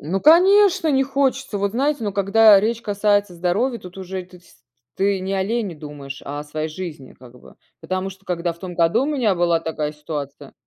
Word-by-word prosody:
Ну 180 +6 -2
конечно, 375 - +5
не 270 -1 +3
хочется, 270 -4 -1
вот 200 0 -1
знаете, 275 +1 0
но 205 - -2
когда 205 +2 +6
речь 225 +2 -1
касается 205 -2 +1
здоровья, 200 +9 -1
тут 180 -1 -12
уже 190 0 -5
ты 180 0 -17
сь - - -22 0.4
ты 195 0 +1
не 190 +1 -4
о 190 -1 0
лени 210 -3 -2
думаешь, 145 -2 -9
а 145 +1 -5
о - - -8
своей 155 +1 -4
жизни 155 -5 -8
как 125 0 -15
бы. - - -17 0.3
Потому 185 +1 -3
что, 195 +1 -16
когда 175 -1 -2
в 165 - -19
том 180 -1 -7
году 170 +9 +2
у - - -2
меня 255 -9 +1
была 170 -1 +2
такая 155 -2 -3
ситуация. 145 -2 -7
190 Hz, 210 wpm, -21 LUFS, 165-225 Hz, 0.4 s, когда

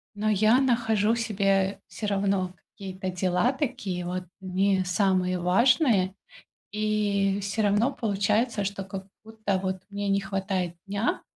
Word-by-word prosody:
но 215 +1 0
я 215 +4 +4
нахожу 230 -4 +2
себе 195 -3 +1
всё 210 - -5
равно 195 -2 0 0.2
какие-то 190 -1 -5
дела 185 +5 +1
такие, 200 - -3
вот, 180 +1 -3 0.2
не 190 +1 +1
самые 185 -1 +1
важные. 205 - +3 0.6
И 205 -2 +1
всё 200 +2 -1
равно 210 +6 +2
получается, 210 +1 0
что 195 0 -3
как 190 0 -7 0.2
будто, 215 -3 -2
вот, 190 0 -1
мне 205 0 -3
не 195 0 +2
хватает 195 -2 -2
дня, 200 +3 -1
200 Hz, 130 wpm, -26 LUFS, 190-215 Hz, 0.6 s, я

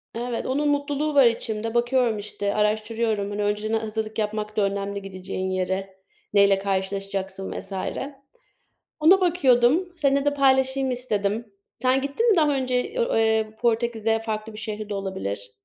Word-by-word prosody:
Evet 240 0 -3
onun 290 +3 +1
mutluluğu 290 +1 -1
var 275 -2 +7
içimde. 225 -1 -1
Bakıyorum 240 -2 +2
işte 205 0 -3
araştırıyorum. 215 0 0
Hani 205 0 -2
önceden 210 +2 0
hazırlık 220 0 -4
yapmak 215 0 -3
da - - +3
önemli 200 0 -1
gideceğin 190 -1 -5
yere. 190 +1 -2 0.4
Neyle 200 -1 +5
karşılaşacaksın 195 0 -3
vs. - - -8 1.3
Ona 365 +5 +6
bakıyordum, 325 0 +3
seninle 280 -2 +2
de 290 - +2
paylaşayım 265 -1 +2
istedim. 215 -3 -2 0.3
Sen 260 +1 +3
gittin 285 - 0
mi - - +5
daha 295 -3 +3
önce 255 - -1
o - - +1
eee 220 -1 +1
Portekiz'e 225 -1 +1
farklı 220 0 -4
bir - - -10
şehri 215 -1 -5
de - - -3
olabilir? 105 - -4
220 Hz, 145 wpm, -24 LUFS, 200-260 Hz, 1.3 s, var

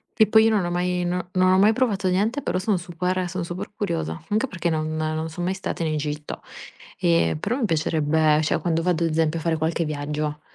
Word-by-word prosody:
E 220 - +5
poi 220 +1 +6
io - - +5
non 205 -4 +2
ho 175 - -2
mai 180 0 0
non 180 0 -2
non 185 0 +4
ho - - +4
mai 215 +3 +5
provato 210 -6 0
niente 215 +10 +1
però 185 - -1
sono 200 0 +1
super 180 +1 -2
sono 185 0 -3
super 175 +2 -5
curiosa, 165 - -3
anche 215 +5 +1
perché 175 -6 -2
non 155 0 -1
non 155 0 -2
sono 175 +2 -4
mai 190 - +1
stata 190 -3 -4
in 155 - 0
Egitto 150 0 -4 0.6
e 85 -2 +2
però 245 - -1
mi 260 - 0
piacerebbe, 155 -2 +2
cioè, 155 - +1
quando 165 0 0
vado 170 -1 +1
ad 165 - 0
esempio 160 +1 +1
a - - -7
fare 165 0 +1
qualche 160 +1 0
viaggio, 150 0 -3
170 Hz, 230 wpm, -24 LUFS, 155-185 Hz, 0.6 s, poi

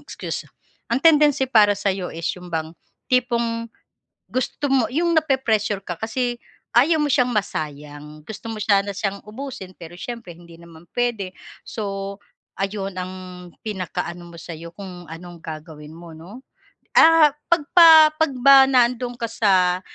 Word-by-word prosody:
excuse. - - -6 0.4
Ang 235 - +2
tendency 295 -4 +4
para 210 -4 +5
sa'yo 190 -2 -2
is 165 0 -6
yung 180 -1 -12
bang 160 0 -4 0.3
tipong 235 -2 0 0.6
gusto 255 +3 -2
mo 260 -4 +3
'yong 340 +5 0
napre-pressure 260 - +1
ka 175 -3 -6
kasi 240 +2 -2 0.4
ayaw 305 +7 +4
mo - - +1
siyang 250 -2 +2
masayang, 150 -5 -5
gusto 220 +1 -9
mo 220 - -5
sana 200 -1 +1
siyang 195 0 -3
ubusin 220 -5 -8
pero 170 0 -12
siyempre 230 -7 -7
hindi 170 0 -16
naman 170 0 -16
pwede 240 -6 -1 0.4
so, 200 -2 -5 0.4
ayun 195 0 -3
ang 185 +1 -5 0.5
pinaka-ano 175 -3 -5
mo 170 - -12
sa'yo, 165 0 -9
kung 180 -3 -9
anong 175 +1 -10
gagawin 155 -1 -9
mo 165 -1 -12
'no. 190 +10 -12 0.6
Ah, 320 -3 +7 0.2
'pag 340 -3 +3
pa 320 -3 +9
'pag 315 -2 +1
ba 275 +1 +8
nandoon 245 -1 +1
ka 235 - -1
sa 185 -5 +2
205 Hz, 145 wpm, -22 LUFS, 175-250 Hz, 0.6 s, pa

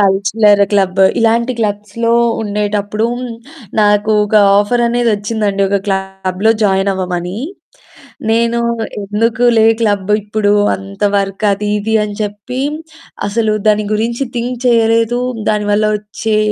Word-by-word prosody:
Cultural 200 +1 +3
club 195 -1 +1 0.2
ఇలాంటి 230 +2 +2
క్లబ్స్‌లో 210 +2 -1 0.3
ఉండేటప్పుడు, 210 +1 -1 0.8
నాకు 210 +1 +2
ఒక 210 - -4 0.2
ఆఫర్ 240 +4 +1
అనేది 240 0 +1
వచ్చిందండి. 205 -1 -1
ఒక 200 - +2
క్లబ్‌లో 190 +1 -1
జాయిన్ 195 0 +2
అవ్వమని. 180 0 -3 0.9
నేను 235 +1 +1 0.4
ఎందుకులే 225 +3 +2 0.2
క్లబ్ 205 -3 0
ఇప్పుడు, 210 0 0 0.2
అంత 195 +1 -10
వర్క్ 195 +1 -2
అది 205 +1 -2
ఇది 215 +2 -2
అని 210 -1 -4
చెప్పి 210 +4 -5 0.7
అసలు 215 +1 0
దాని 210 0 +3
గురించి 235 +5 -1
థింక్ 245 +1 -3
చేయలేదు, 230 0 +2 0.3
దాని 210 -1 0
వల్ల 210 +1 +2
వచ్చే 210 +1 -3
210 Hz, 115 wpm, -14 LUFS, 200-225 Hz, 0.9 s, Cultural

